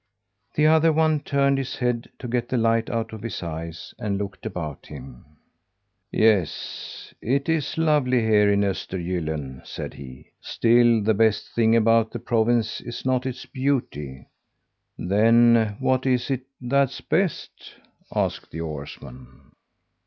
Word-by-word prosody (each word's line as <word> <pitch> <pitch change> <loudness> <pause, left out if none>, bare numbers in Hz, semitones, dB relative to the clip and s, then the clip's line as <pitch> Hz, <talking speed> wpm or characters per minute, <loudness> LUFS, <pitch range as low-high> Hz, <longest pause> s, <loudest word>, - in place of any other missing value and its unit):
The 150 - +3
other 160 +1 +5
one 155 -1 +2
turned 140 -1 +1
his 135 - -4
head 125 -2 -1
to 125 - -7
get 120 0 -1
the 130 - 0
light 115 0 +2
out 115 -1 -3
of 110 - -7
his 110 -4 -5
eyes, 80 0 -6
and 105 -4 -2
looked 100 -1 -5
about 80 -5 -6
him. 65 -2 -11 0.9
"Yes, 105 -7 0
it 135 +4 0
is 160 -3 -1
lovely 145 -6 +2
here 105 -2 +4
in 100 0 +2
Östergylln," 85 -8 -3
said - - -7
he. 65 -2 -12
"Still 120 -1 +3
the 110 +2 +3
best 110 0 +2
thing 115 -1 +3
about 115 0 +4
the 120 - -6
province 115 0 +1
is 120 +1 -7
not 130 0 +1
its 130 -1 -6
beauty." 95 - -3 0.7
"Then 115 +2 +4
what 130 0 +1
is 125 +1 +1
it 130 -1 -2
that's 135 +1 +1
best?" 190 -5 -2 0.4
asked - - -2
the 80 - -6
oarsman. 70 -4 -9
115 Hz, 140 wpm, -24 LUFS, 95-130 Hz, 0.9 s, other